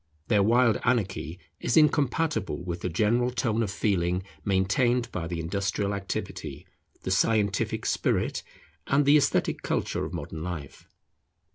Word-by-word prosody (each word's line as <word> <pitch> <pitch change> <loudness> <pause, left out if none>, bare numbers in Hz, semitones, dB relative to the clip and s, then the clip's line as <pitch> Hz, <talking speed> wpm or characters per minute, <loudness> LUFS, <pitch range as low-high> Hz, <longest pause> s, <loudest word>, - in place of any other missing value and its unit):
Their 105 - +4
wild 115 +1 +4
anarchy 100 -8 0 0.2
is - - 0
incompatible 145 - +2
with 85 -1 -4
the 90 - -2
general 110 +8 +2
tone 115 -2 0
of 110 - 0
feeling 90 -2 0 0.2
maintained 105 +6 +1
by 85 -2 -3
the 85 -1 -4
industrial 100 +4 -1
activity, 100 -1 -5 0.4
the 95 - -2
scientific 100 0 +1
spirit, - - 0 0.5
and 140 +1 +3
the 145 +2 +6
esthetic 140 -1 +1
culture - - -1
of 80 - -4
modern 80 -1 -6
life. 80 -5 -7
100 Hz, 135 wpm, -27 LUFS, 90-120 Hz, 0.5 s, the